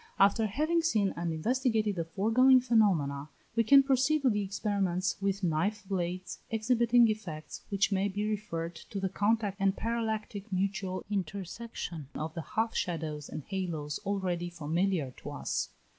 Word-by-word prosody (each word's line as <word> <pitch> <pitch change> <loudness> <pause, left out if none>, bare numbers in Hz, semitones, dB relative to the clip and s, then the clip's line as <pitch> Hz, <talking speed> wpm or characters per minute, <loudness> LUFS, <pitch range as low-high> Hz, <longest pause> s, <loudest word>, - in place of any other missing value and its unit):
After 200 +3 +4
having 310 - +1
seen 215 - +1
and 170 0 -2
investigated 220 +3 +1
the 165 -2 -2
foregoing 225 +9 +5
phenomena, 180 - +2 0.3
we 230 - +4
can 275 +5 +7
proceed 275 +2 +2
to 260 - +5
the 210 -1 0
experiments 195 -2 0
with 195 0 -1
knife 185 +5 0
blades, 185 -1 -3
exhibiting 235 +1 +4
effects 185 -8 -4
which 200 0 +1
may 195 0 +2
be 205 +2 -2
referred 175 -6 -3
to 195 +4 -7
the 190 -1 -1
contact 205 0 +1
and 195 0 +2
parallactic 220 -2 -3
mutual 190 0 -1
intersection 190 - -4
of 155 +1 -4
the 165 - -4
half 220 +9 -1
shadows 155 -4 -3
and 155 - -6
halos 165 -6 -3
already 185 -4 -1
familiar 170 -2 -1
to - - -8
us. - - -2
200 Hz, 150 wpm, -30 LUFS, 175-220 Hz, 0.3 s, can